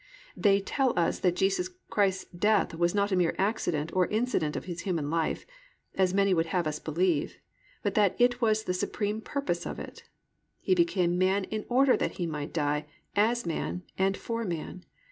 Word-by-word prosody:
They 200 -1 +3
tell 260 +3 0
us 170 -1 +1
that 180 -2 +2
Jesus 200 - +1 0.2
Christ's 190 -2 +1
death 210 +2 +2
was 170 +3 +1
not 200 0 +1
a - - +3
mere 175 -2 +2
accident 175 -6 0
or 185 -1 +3
incident 215 -9 0
of - - -4
His 175 -1 -5
human 165 -6 -2
life 165 -1 -1 0.5
(as 190 -1 +2
many 200 0 +3
would 165 -1 +1
have 175 0 0
us 155 0 -2
believe), 165 -1 0 0.5
but - - 0
that 205 -3 +3
it 245 0 +3
was 220 -1 +2
the 180 - -1
supreme 205 +3 -2
purpose 200 - -2
of - - -5
it. - - -9 0.6
He - - +1
became 185 - +2
man 190 +2 +2
in 215 +2 -4
order 260 +2 +5
that - - -1
He 175 - -3
might 150 -3 -4
die 150 -1 -1 0.3
as 225 +3 +2
man 170 +2 -3
and 195 +1 +1
for 230 0 -3
man. 180 -1 -5
190 Hz, 185 wpm, -29 LUFS, 170-215 Hz, 0.6 s, order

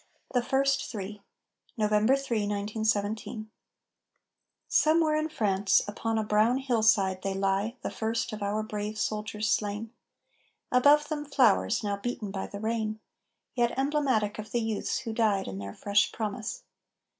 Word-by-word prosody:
THE 245 - +3
FIRST 270 +2 +1
THREE 205 -2 -6 0.6
[November 215 +3 +3
3, 275 -4 -2
1917] 215 +1 -2 1.2
"Somewhere 315 0 +3
in 310 +1 0
France," 200 -8 +2
upon 225 +2 -2
a 220 - +1
brown 215 +4 +3
hillside, 220 -7 +2
They 195 0 -2
lie, 195 +4 0
the - - -3
first 225 +1 -2
of 215 - -6
our 205 +2 -1
brave 210 0 -4
soldiers 215 0 -2
slain; 210 +2 -1 0.8
Above 290 +4 +5
them 300 -2 -2
flowers, 245 - +3
now 200 -1 -1
beaten 215 -1 -4
by 195 -1 -4
the 200 - -8
rain, 220 0 -2 0.5
Yet 240 -1 0
emblematic 270 -7 +1
of 215 - -6
the 240 - +1
youths 220 -2 -1
who 230 -3 -5
died 210 -4 +1
In 95 - -5
their 100 0 -7
fresh 205 0 +2
promise. 220 - -4
215 Hz, 145 wpm, -28 LUFS, 205-245 Hz, 1.2 s, Above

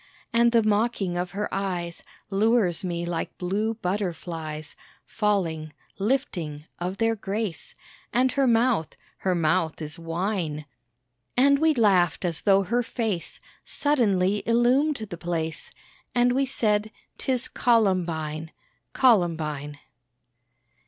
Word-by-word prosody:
And 235 0 +4
the 230 -1 +4
mocking 210 -3 +1
of 180 0 -2
her 210 +1 -2
eyes 180 -3 -3 0.3
Lures 200 -3 +2
me 170 -2 -2
like 170 -1 -4
blue 210 +5 -1
butterflies 170 -6 -4 0.3
Falling 170 -8 -1 0.3
lifting 180 - -1
of 180 +2 -3
their 225 +1 +2
grace, 205 -2 -4 0.4
And 255 +1 +2
her 275 -2 +2
mouth 230 -7 +2 0.2
her 185 -1 0
mouth 160 0 +1
is 150 0 -5
wine." 165 -2 -2 0.7
And 280 +2 +5
we 315 0 +3
laughed 190 -7 +3
as 170 -3 0
though 195 -1 +4
her 235 +6 +1
face 225 -7 -3 0.2
Suddenly 205 -9 +2
illumed 250 +6 +3 0.2
the 175 - -5
place, 165 -2 -3 0.5
And 245 0 +4
we 270 +2 +1
said, 215 -4 +1 0.3
"'Tis 255 -2 +1
Columbine, 170 -9 +1 0.4
Columbine." 160 - +2
195 Hz, 115 wpm, -25 LUFS, 170-230 Hz, 0.7 s, And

